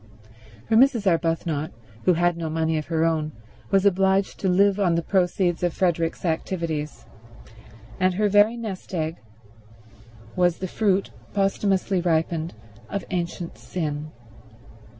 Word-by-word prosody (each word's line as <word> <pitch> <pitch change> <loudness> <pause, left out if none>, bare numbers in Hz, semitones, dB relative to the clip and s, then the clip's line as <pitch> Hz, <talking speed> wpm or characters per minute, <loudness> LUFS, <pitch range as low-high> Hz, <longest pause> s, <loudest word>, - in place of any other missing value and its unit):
For 220 - +2
Mrs. 240 -3 +4
Arbuthnot, 165 -3 0 0.4
who 185 - +5
had 175 +1 +2
no 165 -1 -4
money 160 0 0
of 155 - -7
her 165 -1 +1
own, 155 -2 0 0.4
was 195 0 +3
obliged 195 0 +2
to 190 - 0
live 200 +2 +3
on 180 -4 +2
the 170 - 0
proceeds 180 -2 +1
of 175 -2 0
Frederick's 170 -2 0
activities, 160 -2 -3 0.9
and 185 -1 +2
her 210 +2 +2
very 205 +3 +4
nest 200 -5 -6
egg 160 0 -2 1.2
was 175 -2 +2
the 185 - -4
fruit, 195 0 0 0.2
posthumously 195 -1 +1
ripened, 165 -2 0 0.3
of 200 - -3
ancient 175 -1 -4
sin. 155 -3 -4
175 Hz, 130 wpm, -24 LUFS, 165-195 Hz, 1.2 s, who